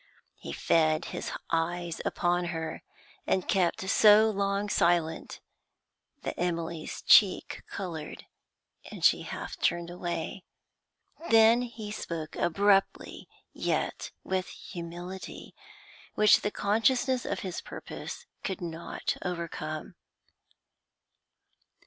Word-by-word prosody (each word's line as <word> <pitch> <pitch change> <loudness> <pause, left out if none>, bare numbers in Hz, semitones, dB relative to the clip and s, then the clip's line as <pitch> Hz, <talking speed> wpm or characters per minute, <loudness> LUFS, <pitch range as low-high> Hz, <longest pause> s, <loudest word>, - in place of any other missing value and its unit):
He - - -7
fed 155 -1 +2
his - - -4 0.2
eyes 170 +1 -1
upon 175 0 0
her, 165 -2 -4 0.5
and 185 - +1
kept 190 0 +1
so 215 +2 +6
long 200 0 0
silent 170 -4 +1 0.8
that - - -4
Emily's 170 -2 -3
cheek 200 -4 +5
coloured, 165 -6 -6 0.7
and - - -3
she - - +5
half - - -6
turned 170 0 0
away. 175 +1 -4 0.9
Then 225 +1 +6
he 230 -4 -6
spoke 165 -6 -5
abruptly, 195 +3 +1 0.3
yet - - -2
with 185 -1 -1
humility, 175 +2 -8 0.6
which 215 -1 +6
the 205 - 0
consciousness 245 +5 +1
of - - -3
his 185 -3 -4
purpose - - -8 0.2
could 190 - -3
not 170 -1 -4
overcome. 165 -3 -4
175 Hz, 100 wpm, -29 LUFS, 170-205 Hz, 0.9 s, so